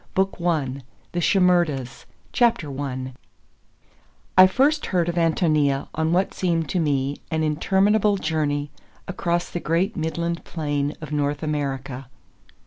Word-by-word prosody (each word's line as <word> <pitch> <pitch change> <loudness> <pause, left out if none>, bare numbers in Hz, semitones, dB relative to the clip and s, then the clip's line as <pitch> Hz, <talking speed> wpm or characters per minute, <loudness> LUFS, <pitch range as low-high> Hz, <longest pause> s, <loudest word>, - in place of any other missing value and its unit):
BOOK 190 0 +1
I— 140 -6 0 0.3
THE 175 - -2
SHIMERDAS 175 -9 +1 0.3
I 140 - 0 1.2
I 185 0 +9
FIRST 280 +9 +2
heard 175 -3 +1
of 175 - 0
Ántonia(1) 155 -4 +1
on 160 +1 0
what 185 +3 +1
seemed 165 -4 0
to 185 - 0
me 140 -3 0
an 160 0 0
interminable 200 +7 +2
journey 145 -4 -1 0.4
across 175 -2 -1
the 175 - -3
great 175 +7 0
midland 170 0 -2
plain 145 -3 -2
of 155 - -8
North 145 +1 -1
America. 135 -3 -3
160 Hz, 125 wpm, -23 LUFS, 145-180 Hz, 1.2 s, I